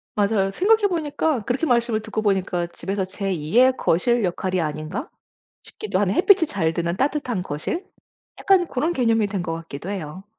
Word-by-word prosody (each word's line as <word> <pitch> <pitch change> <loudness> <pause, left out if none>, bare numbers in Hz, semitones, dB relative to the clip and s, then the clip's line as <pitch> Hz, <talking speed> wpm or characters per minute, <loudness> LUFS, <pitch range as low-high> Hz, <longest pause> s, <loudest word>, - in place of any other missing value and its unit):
맞아요. 200 -2 +1
생각해 415 - +3
보니까 315 -5 -1
그렇게 260 +6 0
말씀을 235 -4 +1
듣고 220 - -3
보니까 190 -4 0
집에서 190 +2 -3
제 195 +1 -4
2 160 +3 -2
의 255 +1 +7
거실 235 +8 +2
역할이 185 +1 -1
아닌가 155 - -4 0.5
싶기도 430 - -4
하는 195 -1 +1
햇빛이 370 -3 +5
잘 160 - -1
드는 170 +1 -2
따뜻한 260 -8 -1
거실 185 - -4 0.5
약간 380 -3 +3
고런 300 +5 -1
개념이 230 -7 +2
된 195 -2 -3
것 165 - -3
같기도 165 0 -7
해요. 185 -2 -6
205 Hz, 365 characters per minute, -23 LUFS, 180-275 Hz, 0.5 s, 의